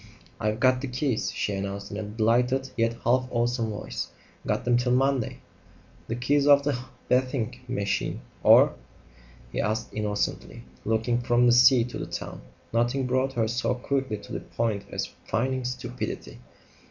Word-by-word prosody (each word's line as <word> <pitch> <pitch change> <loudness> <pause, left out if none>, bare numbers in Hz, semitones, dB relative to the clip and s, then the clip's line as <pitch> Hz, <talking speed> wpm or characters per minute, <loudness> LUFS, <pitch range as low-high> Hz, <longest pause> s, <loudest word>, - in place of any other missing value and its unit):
"I've 105 0 -1
got 130 0 +4
the 140 - -3
keys," 125 -2 -1
she 105 - -2
announced 100 +1 -4
in 100 - -4
a - - -3
delighted, 120 +5 +1
yet 115 0 +1
half 125 +2 +2
awesome 120 -1 0
voice. 105 - -4 0.4
"Got - - 0
them 120 0 +3
till 125 +1 +2
Monday!" 135 -2 +1 0.7
"The 115 - -2
keys 140 +4 +2
of 140 -1 +7
the 145 -1 +1 0.3
bathing 125 -2 0
machine, 100 -5 -1 0.2
or - - +7 0.4
?" - - -24
he - - -1
asked 110 +2 -2
innocently, 105 - -2 0.2
looking 115 +2 +1
from 120 0 +3
the 120 - +6
sea 125 0 +7
to 120 - -6
the - - -4
town. - - -6 0.3
Nothing 120 +3 +1
brought 130 +1 +1
her 115 -3 +1
so 120 +2 0
quickly 130 -2 -1
to - - -13
the - - -2
point 110 -4 -2
as - - -2 0.2
feigning 130 +2 0
stupidity. 125 0 -5
120 Hz, 165 wpm, -26 LUFS, 110-130 Hz, 0.7 s, of